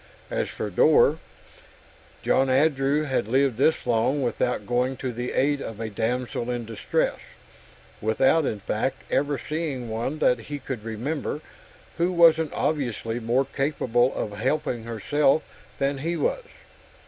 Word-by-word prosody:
As - - -1
for - - -5
Dor 475 +1 +5 1.0
John 135 0 +3
Andrew 140 +1 +2
had 135 -8 -1
lived 130 0 +2
this 155 +5 +2
long 125 +4 +1
without 125 0 -1
going 125 +2 0
to 130 -2 -4
the 120 +2 -4
aid 145 +1 +1
of 115 -2 -6
a 110 -1 -4
damsel 120 +3 -2
in 120 -1 -2
distress 110 -2 -1 0.8
without, 130 +9 +3
in 110 -7 -2
fact, 130 +7 -2
ever 145 0 +1
seeing 150 -7 -3
one 120 +7 -2
that 125 -5 +3
he 145 +6 -6
could 130 -5 -6
remember, 125 +7 -3 0.6
who 175 +2 +2
wasn't 160 -3 +5
obviously 120 -6 -1
more 120 +4 +1
capable 130 -3 +1
of 105 - -3
helping 120 +1 -1
herself 135 +6 +1 0.3
than 140 0 0
he 165 +4 -1
was. 480 - -1
130 Hz, 140 wpm, -25 LUFS, 120-145 Hz, 1.0 s, Dor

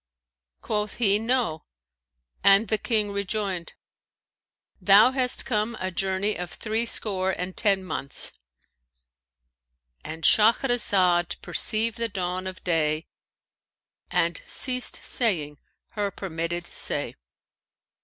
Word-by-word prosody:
Quoth 210 -1 -2
he, 205 -3 +2
'No,' 225 -9 -1 0.8
and 200 +2 +5
the 220 - +1
King 215 -3 -1
rejoined, 200 -3 -3 1.1
'Thou 200 +6 +6
hast 255 -2 0
come 220 -1 -1
a 185 0 -3
journey 195 +3 0
of 180 -1 -4
threescore 215 -4 0
and 180 +1 -5
ten 195 -3 +1
months.'"—And 60 - -11
Shahrazad 200 -7 +3
perceived 225 0 +1
the 230 0 -1
dawn 185 -1 -3
of 185 0 -8
day 155 -3 0 1.0
and 170 -2 0
ceased 250 -1 -1
saying 155 - 0 0.3
her 205 -2 -2
permitted 175 -2 -4
say. - - 0
190 Hz, 95 wpm, -25 LUFS, 165-215 Hz, 1.1 s, Thou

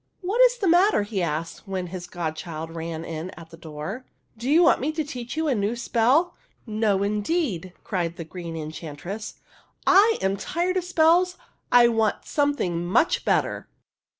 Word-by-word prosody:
''What 425 +7 +3
is - - -6
the 405 -5 -1
matter?" 350 - +4
he 205 -2 -3
asked, 165 +4 -3
when 190 -2 -3
his 175 -1 -6
godchild 165 -2 -5
ran 165 0 -5
in 165 +2 -5
at 165 -1 -12
the - - -10
door. 165 - -7 0.2
" - - -44
Do 235 +4 -4
you 325 +4 +6
want 340 - +4
me 290 +4 0
to 315 0 -1
teach 250 -1 -7
you 320 0 0
a 280 - +2
new 210 +1 0
spell? 250 +8 +2
" - - -39
" - - -38
No, 215 -3 +1
indeed! 210 - -1
" - - -38
cried 170 -4 -2
the 170 - -6
Green 170 -1 -7
Enchantress. 160 +6 -6 0.3
" - - -34 0.2
I 425 +4 +6
am 195 +1 0
tired 350 - -1
of 360 - -1
spells; 360 +1 +3 0.3
I 245 -1 +7
want 225 -2 0
something 285 - 0
much 185 - +2
better." - - 0
210 Hz, 190 wpm, -25 LUFS, -, 0.3 s, I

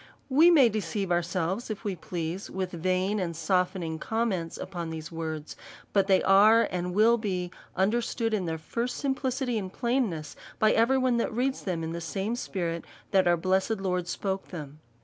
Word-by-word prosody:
We 305 +6 +6
may 295 -8 +7
deceive 200 -3 -2
ourselves, 175 +5 -1
if 215 -1 -5
we 200 -4 -2
please, 170 +2 -4
with 185 -1 -3
vain 185 +4 0
and 170 -3 -2
softening 180 -1 0
commands 200 -6 -1
upon 175 -3 -5
these 160 0 -6
word.s, 160 -2 -5 0.4
but 195 -1 +3
they 190 -2 +4
are 215 +4 +6
and 180 0 -2
will 230 +3 +5
be 180 -5 -2 0.2
understood 225 +3 0
in 190 -5 0
their 160 0 -2
first 235 +10 -3
simplicity 265 -3 -1
and 190 -2 -6
plainness, 230 - -1 0.2
by 215 0 +4
every 235 +4 +3
one 255 -2 +2
that 235 - 0
reads 255 +4 -1
them 175 -4 -2
in 160 - -3
the 170 +1 -4
same 195 +7 -2
spirit 170 -7 -3 0.3
that 190 -2 +4
our 175 0 +4
blessed 190 +5 +1
Lord 180 -2 -1
spoke 195 +2 -3
them. 150 -4 -8
190 Hz, 175 wpm, -28 LUFS, 170-225 Hz, 0.4 s, may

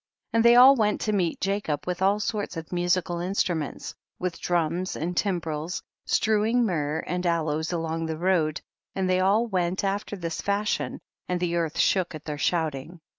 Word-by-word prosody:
And 230 0 +4
they 235 0 +7
all 260 +3 +9
went 210 -4 +1
to 215 - 0
meet 180 -2 0
Ja 200 +1 +1
cob 145 -2 -3
with 180 0 -3
all 200 +2 +3
sorts 205 -4 -3
of 160 -1 -7
musical 175 0 0
instru 180 0 0
ments, 150 -3 -5 0.2
with 180 -2 -4
drums 175 +1 0
and 175 +3 -3
timbrels^, 170 -4 -2 0.2
strewing 220 +3 +2
myrrh 160 -5 -1
and 180 0 -2
aloes 160 -2 0
all 170 -2 -1
along 165 0 -2
the 160 -1 -3
road, 165 -3 +1 0.3
and 190 -1 0
they 185 0 +2
all 200 +5 +3
went 185 -4 -1
after 200 +1 -2
this 165 -4 -4
fashion, 205 +1 -1 0.3
and 180 0 0
the 175 -1 -1
earth 165 -3 -1
shook 185 -4 +2
at 155 - -10
their 150 -2 -4
shouting. 160 0 -1
180 Hz, 185 wpm, -26 LUFS, 165-200 Hz, 0.3 s, all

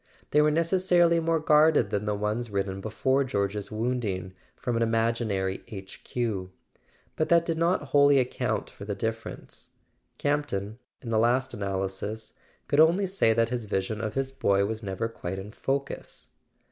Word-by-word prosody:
They 150 - +5
were 150 - +4
necessarily 170 +1 +3
more 165 0 +1
guarded 155 0 +4
than 105 +1 -1
the 105 -1 0
ones 105 +3 -2
written, 95 -1 -2
be¬ 110 - -5
fore 130 +5 +2
George's 100 -4 -2
wounding, 110 -5 -2 0.2
from 120 - -3
an 115 - 0
imaginary 115 -4 0
H. 95 -5 -10
Q.; 105 -7 -2 0.7
but 155 - 0
that 170 -1 +5
did 165 -1 -1
not 170 -4 +1
wholly 140 -1 +5
account 125 -1 0
for - - -12
the 100 0 -3
difference. 110 +2 -6 0.4
Campton, 125 -8 -1 0.2
in 115 - -5
the 110 - +3
last 125 +3 +2
analysis, 100 +2 -4 0.3
could 145 - +2
only 170 +5 +5
say 190 -11 +2
that 115 0 +2
his 120 -2 -3
vision 105 +2 -2
of 110 0 -3
his 135 0 -1
boy 100 -7 +2
was 110 +1 -4
never 100 +2 -2
quite 95 -5 -6
in 95 +2 -7
focus. 135 +4 -4
115 Hz, 165 wpm, -27 LUFS, 100-145 Hz, 0.7 s, They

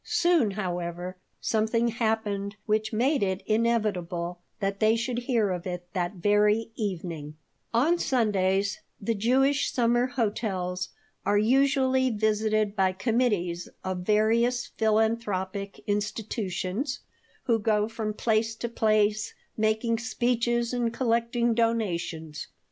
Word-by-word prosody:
Soon, 345 -10 +3
however, 175 -1 -3 0.2
something 225 +2 +1
happened 215 -3 -1
which 215 0 0
made 260 +6 +2
it 190 -1 -1
inevitable 200 -6 0 0.2
that 195 -1 -2
they 220 +1 +4
should 235 +1 -1
hear 235 -5 +1
of 180 +1 -4
it 180 -1 -4
that 180 0 -1
very 210 +4 +2
evening 170 -7 -4 0.4
On 305 +10 +3
Sundays 200 - +1 0.2
the 230 +3 -1
Jewish 265 +6 +2
summer 240 0 +2
hotels 200 -7 -2 0.3
are 205 - +2
usually 260 +3 +3
visited 215 -1 +1
by 190 -2 +2
committees 190 -5 0
of 185 -1 -2
various 225 +5 +2
philanthropic 215 -3 0
institutions 210 +3 -2 0.4
who 230 -2 +2
go 210 0 +2
from 220 -2 -4
place 225 0 +1
to 235 +1 -4
place 215 -1 +1 0.2
making 220 +1 +1
speeches 240 0 0
and 240 -2 0
collecting 235 0 +1
donations. 175 -9 -1
215 Hz, 115 wpm, -27 LUFS, 195-235 Hz, 0.4 s, they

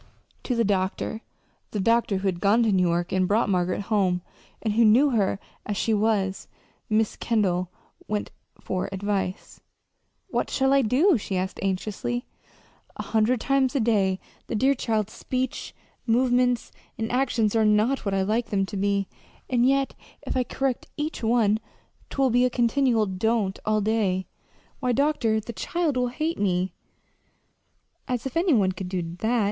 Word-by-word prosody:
To 250 - 0
the 230 - +2
doctor 195 +2 -1 0.5
the 210 - -3
doctor 230 -1 +2
who 195 +1 -2
had 180 -2 -1
gone 210 +5 +4
to 220 - +2
New 185 -2 +3
York 175 +1 -1
and 185 -1 +2
brought 210 +2 +2
Margaret 180 0 0
home, 195 -4 +1 0.4
and 215 -2 -1
who 230 +2 +4
knew 245 +7 +5
her 205 -5 +1 0.3
as 205 -1 -3
she 225 - +1
was 205 -3 0 0.4
Mrs. 215 0 +1
Kendall 185 -6 +1 0.4
went 210 -1 -2 0.3
for 185 -1 -3
advice. 195 -1 -3 0.7
"What - - -1
shall 270 0 +2
I 275 - +5
do?" 270 - +3
she 195 -2 -3
asked 185 +1 -3
anxiously. 205 +5 -2 0.7
"A - - -5
hundred 225 +2 +1
times 275 0 +1
a - - +3
day 200 -5 +2 0.3
the - - -3
dear 265 +6 +3
child's 220 -5 -1
speech, 255 -1 -3 0.3
movements, 245 +1 +2 0.3
and 225 0 -3
actions 240 -4 +1
are 225 - +4
not 215 +5 +2
what 200 -2 -1
I 190 - +2
like 220 +4 0
them 195 -2 0
to 200 +1 -6
be. 200 0 0 0.4
And 245 0 +3
yet 275 0 +2 0.3
if - - -4
I 255 - +2
correct 260 +1 -2
each 305 +2 -3
one, 220 -2 +2 0.5
'twill 270 -2 +1
be 245 +2 +4
a 250 - +3
continual 240 -1 +2
'don't' 200 +1 0
all 215 0 +2
day. 200 -3 0 0.5
Why, 250 -2 0
doctor, 255 -6 +2
the 230 +2 -7
child 335 +3 -1
will 250 0 +1
hate 310 +7 -2
me!" 185 -2 0 1.3
"As 250 -2 -2
if 265 - -5
any 335 -3 +3
one 195 -4 +3
could 185 0 -6
do 180 -2 -2 0.2
that!" 235 +2 +1
220 Hz, 165 wpm, -25 LUFS, 195-250 Hz, 1.3 s, knew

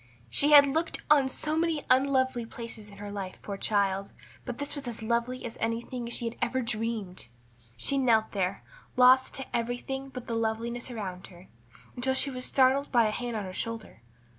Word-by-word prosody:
She 285 - +4
had 290 -1 +9
looked 315 +4 -1
on 280 -3 +5
so 305 +3 -1
many 325 -2 0
unlovely 260 -1 +2
places 225 -2 -7
in 200 -1 -14
her 205 0 -7
life, 195 -2 -5
poor 200 - -4
child; 195 -1 0 0.3
but 245 -2 -5
this 285 0 -2
was 285 -3 -6
as 230 -2 -5
lovely 235 +3 -1
as 230 - -7
anything 235 +2 -2
she 235 0 -1
had 230 - -3
ever 260 +2 0
dreamed. 220 - -3 0.5
She 275 - +1
knelt 225 -4 +3
there, 195 -1 -2 0.3
lost 255 +1 +5
to 265 - -4
everything 245 +3 -3
but 255 -2 -8
the 235 - -4
loveliness 230 +2 -2
around 195 -6 -6
her, 180 0 -16 0.5
until 260 +2 0
she 275 +1 +4
was 255 -1 -1
startled 270 +1 +3
by 235 -3 +5
a 215 - +1
hand 240 +1 -4
on 210 - -3
her 185 - -7
shoulder. 230 - -5
235 Hz, 190 wpm, -28 LUFS, 220-260 Hz, 0.5 s, had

